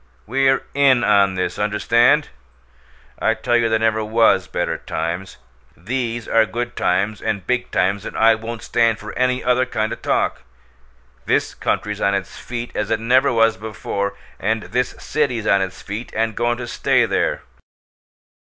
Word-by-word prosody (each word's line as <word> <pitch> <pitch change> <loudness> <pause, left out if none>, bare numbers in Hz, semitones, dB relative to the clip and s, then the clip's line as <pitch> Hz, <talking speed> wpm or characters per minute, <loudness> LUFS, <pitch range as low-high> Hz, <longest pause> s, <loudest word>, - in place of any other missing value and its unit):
We're 135 +3 +2
IN 135 -3 +4
on 100 -3 +3
this 90 - -2
understand? 115 +8 +3 0.9
I 110 - +2
tell 120 +2 0
you 115 -1 +3
there 110 - +3
never 110 0 +1
WAS 110 -4 +3
better 85 -2 -2
times. 85 +2 -4 0.4
These 120 +4 -3
are 110 -1 +3
good 120 +2 -4
times 100 +4 0
and 100 -4 -2
big 125 +2 -1
times, 100 +2 0
and - - -7
I 115 0 +6
won't 110 +1 -6
stand 115 -2 +2
for 105 +1 -9
any 125 0 +1
other 125 +1 +2
kind 110 -2 -1
o' - - -3
talk. - - -1 0.9
This - - +1
country's 105 0 -2
on 100 0 +2
its 95 -1 -4
feet 120 -1 -6
as 105 0 -2
it 110 - +1
never 125 +4 +3
was 115 -3 +3
before, 100 -1 -4 0.2
and 110 +2 -1
this 125 +5 -2
city's 130 -8 -1
on 100 -2 +3
its 95 -1 -5
feet 105 +4 -6
and 110 -1 0
goin' 120 0 0
to 120 -1 -6
stay - - +2
there!" - - -1
110 Hz, 165 wpm, -20 LUFS, 100-120 Hz, 0.9 s, I